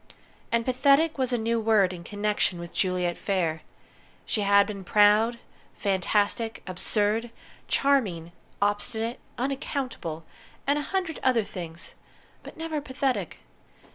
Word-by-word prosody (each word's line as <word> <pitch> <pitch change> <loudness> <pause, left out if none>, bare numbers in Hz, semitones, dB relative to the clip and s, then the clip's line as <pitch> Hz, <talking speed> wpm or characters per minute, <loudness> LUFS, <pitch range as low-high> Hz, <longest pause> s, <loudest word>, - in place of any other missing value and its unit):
And 230 0 +1
"pathetic" 280 +4 +3
was 260 -1 +1
a 245 - +2
new 230 +1 0
word 215 -4 +3
in 175 -1 -8
connection 205 -2 0
with 170 0 -8
Juliet 180 -2 0
Phayre! 170 -5 0 0.6
She 215 - -1
had 200 0 +5
been 200 -2 -6
proud, 210 +4 +4 0.4
fantastic, 205 +3 0
absurd, 210 +5 0 0.4
charming, 200 -13 +1 0.3
obstinate, 220 +3 -1 0.2
unaccountable, 255 - -3 0.4
and 285 +1 +2
a 290 - -5
hundred 370 -5 -1
other 250 -4 +3
things, 175 -4 -8 0.5
but - - -12
never 320 -2 -3
pathetic. 265 -1 -2
215 Hz, 120 wpm, -27 LUFS, 190-260 Hz, 0.6 s, had